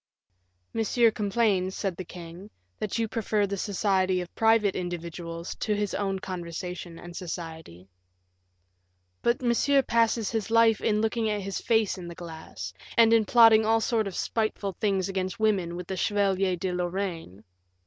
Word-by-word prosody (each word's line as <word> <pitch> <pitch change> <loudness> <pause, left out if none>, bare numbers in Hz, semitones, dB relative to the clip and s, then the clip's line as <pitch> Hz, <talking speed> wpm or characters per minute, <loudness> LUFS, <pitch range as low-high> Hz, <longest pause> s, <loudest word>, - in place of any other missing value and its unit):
"Monsieur 225 +1 +3
complains," 200 -3 0
said 195 -4 -2
the 185 - -6
king, 175 +3 -10 0.3
"that 215 +1 -2
you 225 -1 0
prefer 215 -2 0
the 200 0 -3
society 190 -2 +1
of 180 -1 -7
private 225 -3 +3
individuals 170 -1 -5
to 210 - 0
his 205 -1 -2
own 195 -1 -1
conversation 180 -1 -6
and 175 0 -10
society." 160 - -7 1.3
"But 235 +2 +1
Monsieur 270 +3 +3
passes 230 -2 +1
his 225 -2 -2
life 225 -1 +4
in 210 -1 +1
looking 220 0 0
at 210 -1 -1
his 195 0 -4
face 220 -5 +1
in 175 - -7
the 170 - -8
glass, 160 - -8 0.2
and 230 -1 +6
in 225 -2 +4
plotting 225 -1 +7
all 225 +1 +3
sorts 225 -2 0
of 190 - -6
spiteful 215 -3 -1
things 195 -2 0
against 190 0 -3
women 195 -6 +1
with 180 0 -6
the 190 - -4
Chevalier 195 -2 +1
de 180 +1 -3
Lorraine." 175 - -3
195 Hz, 160 wpm, -27 LUFS, 175-220 Hz, 1.3 s, plotting